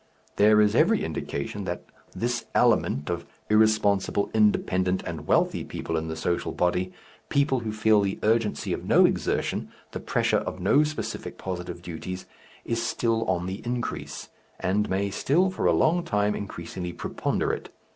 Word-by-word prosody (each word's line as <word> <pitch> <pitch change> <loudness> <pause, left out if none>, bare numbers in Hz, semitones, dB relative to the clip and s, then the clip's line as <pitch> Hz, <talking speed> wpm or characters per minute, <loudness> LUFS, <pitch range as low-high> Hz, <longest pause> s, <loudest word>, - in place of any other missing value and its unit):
There 105 +1 +6
is 105 -1 +3
every - - +3
indication 95 +8 -4
that 90 -1 -4 0.3
this 120 0 -1
element 70 +2 +3
of 85 -1 -4 0.2
irresponsible, 105 -2 +3
independent, 95 -4 +2
and - - -6
wealthy - - +2
people 80 - -4
in 80 0 -1
the 80 - -4
social 85 +2 -1
body, 90 +1 0 0.4
people 140 -2 +2
who 110 -2 -4
feel 110 -1 +3
the 100 -1 -1
urgency 110 0 +1
of - - -4
no - - +5
exertion, - - 0 0.2
the - - -5
pressure - - +1
of - - -5
no 140 +11 +4
specific 155 +1 -4
positive 90 -2 -5
duties, 90 +2 -6 0.4
is 115 0 -1
still 115 -1 0
on 90 -2 0
the 95 +2 -5
increase, 120 0 -4 0.3
and 100 +3 0
may 100 +1 0
still 170 - +2
for 185 - 0
a - - +5
long 155 - +3
time 105 -4 +1
increasingly 90 -3 -5
preponderate. - - -2
100 Hz, 155 wpm, -26 LUFS, 90-115 Hz, 0.4 s, There